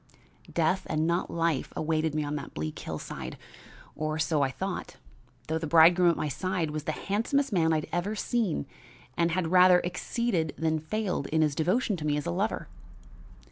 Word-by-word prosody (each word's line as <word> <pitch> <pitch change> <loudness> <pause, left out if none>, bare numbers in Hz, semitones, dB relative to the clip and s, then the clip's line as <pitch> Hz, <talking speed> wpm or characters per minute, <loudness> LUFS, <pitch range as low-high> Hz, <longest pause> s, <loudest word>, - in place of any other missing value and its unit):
Death 175 +3 +1
and 155 0 +1
not 170 +2 0
life 165 -4 0
awaited 155 -1 0
me 155 - 0
on 145 0 -3
that 145 - -7
bleak 75 0 -4
hillside, - - -6 0.6
or 155 0 -2
so 155 -1 +1
I 135 - +2
thought, 130 - -5 0.5
though 160 +1 -1
the 160 - -3
bridegroom 170 +3 +6
at 170 - +1
my - - -1
side 175 +2 -2
was 155 0 -4
the - - 0
handsomest 230 - 0
man 165 -3 +3
I - - +3
had 155 - -4
ever 185 +5 -1
seen 215 -8 -1 0.5
and 170 0 +2
had 170 -1 -1
rather 180 0 +7
exceeded 180 -1 -1
than 160 0 0
failed 180 -3 -2
in 160 +2 +2
his 150 -2 +1
devotion 185 - +1
to 155 - -5
me 145 0 +1
as 150 - -3
a - - -1
lover. - - -1
160 Hz, 185 wpm, -28 LUFS, 155-185 Hz, 0.6 s, rather